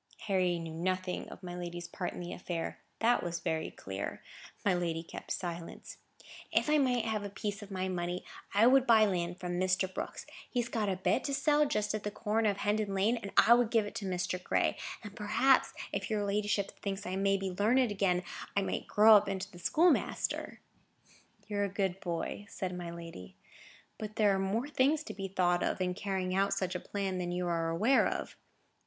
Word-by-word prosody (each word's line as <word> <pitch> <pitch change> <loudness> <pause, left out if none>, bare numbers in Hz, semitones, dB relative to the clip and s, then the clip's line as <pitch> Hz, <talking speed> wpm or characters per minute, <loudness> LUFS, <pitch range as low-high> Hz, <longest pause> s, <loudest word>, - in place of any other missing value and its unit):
Harry 185 -4 +1
knew 165 -1 -6
nothing 185 +2 -2
of - - -11
my 175 -1 -6
lady's 175 -1 -5
part 180 - -4
in - - -8
the 175 0 -5
affair; 175 -2 -4 0.2
that 235 +2 +3
was 170 0 -3
very 160 -2 -1
clear. 95 +1 -5 0.5
My 200 - +4
lady 170 -2 -1
kept - - -9
silence. 170 -2 -5 0.5
"If 300 - +2
I 305 - +5
might 250 -4 +2
have 215 -2 -1
a 200 - -4
piece 205 +1 -4
of 205 - -9
my 190 -1 -2
money, 180 -1 -3 0.3
I 210 +3 +5
would 265 +1 +5
buy 220 -2 +7
land 180 -2 -1
from 175 -1 -3
Mr. 185 0 +1
Brooks; - - -5 0.2
he 245 - -1
has 240 +1 -1
got 215 -4 0
a 190 - 0
bit 190 +7 +1
to 280 - 0
sell 295 +1 +3
just 210 -7 0
at 215 - -2
the 210 - -2
corner 215 +1 0
of 200 - -1
Hendon 205 -1 0
Lane, 205 +5 +3
and 200 -4 -6
I 235 - +8
would 240 -2 +4
give 225 -3 +3
it 205 - -7
to 200 - -4
Mr. 180 0 -2
Gray; - - +1 0.3
and, 205 -1 -9
perhaps, 220 +6 +3 0.2
if - - -3
your 210 -2 0
ladyship 200 0 0
thinks 195 -1 -3
I 185 - -3
may 195 0 +2
be 195 -1 -3
learned 225 +6 +3
again, 185 -3 +1 0.3
I 200 - +3
might - - -3
grow 215 +1 +7
up 200 0 0
into 190 0 -4
the 175 - -12
schoolmaster." 335 - +1 0.9
"You 205 - -3
are 205 - +2
a - - -3
good 190 -1 -1
boy," 175 +3 -4
said 185 -1 -4
my 175 -1 -5
lady. 165 - -9 0.6
"But 215 -1 -6
there 210 -3 +4
are 195 - +1
more 205 +7 0
things 295 +2 +2
to - - -7
be 195 -1 -4
thought 175 -2 +2
of, - - 0
in 180 -1 0
carrying 190 -1 -2
out 195 +1 +2
such 185 -2 -1
a 180 - -2
plan, 195 -1 -3
than 175 -1 -2
you 180 0 -1
are 165 -1 0
aware 215 +11 +4
of. - - -4
195 Hz, 210 wpm, -32 LUFS, 180-215 Hz, 0.9 s, I